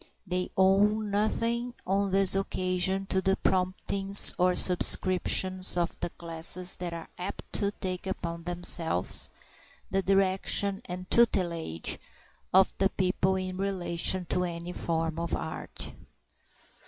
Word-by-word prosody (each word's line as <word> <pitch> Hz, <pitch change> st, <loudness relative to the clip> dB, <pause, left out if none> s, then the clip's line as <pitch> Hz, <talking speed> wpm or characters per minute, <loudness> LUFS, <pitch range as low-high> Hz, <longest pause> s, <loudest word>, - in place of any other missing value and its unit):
They 180 Hz, -1 st, -3 dB
owe 190 Hz, +1 st, +4 dB, 0.2 s
nothing 230 Hz, +3 st, -2 dB
on 195 Hz, +2 st, 0 dB
this 195 Hz, 0 st, +5 dB
occasion 190 Hz, 0 st, -1 dB
to 190 Hz, -1 st, -1 dB
the 190 Hz, 0 st, +1 dB
promptings 195 Hz, +1 st, +5 dB
or 180 Hz, 0 st, +3 dB
the -, -, -5 dB
subscriptions 185 Hz, 0 st, +2 dB
of 170 Hz, 0 st, -1 dB
the -, -, -3 dB
classes 170 Hz, +2 st, 0 dB
that 175 Hz, -1 st, -5 dB
are 165 Hz, -1 st, -8 dB
apt 185 Hz, +3 st, -8 dB
to 200 Hz, -, 0 dB
take 185 Hz, -1 st, -5 dB
upon 170 Hz, -3 st, -5 dB
themselves 175 Hz, -, +2 dB, 0.6 s
the 195 Hz, -, 0 dB
direction 195 Hz, +1 st, 0 dB
and 180 Hz, +1 st, -7 dB
tutelage 170 Hz, -, 0 dB, 0.5 s
of 190 Hz, +1 st, +4 dB
the 195 Hz, -, +2 dB
people 190 Hz, 0 st, -1 dB
in 185 Hz, -1 st, -5 dB
relation 185 Hz, -2 st, -1 dB
to 180 Hz, -, 0 dB
any 170 Hz, 0 st, -6 dB
form 165 Hz, -1 st, -3 dB
of 170 Hz, -1 st, -3 dB
art. 160 Hz, -, -6 dB
185 Hz, 130 wpm, -27 LUFS, 175-195 Hz, 0.6 s, this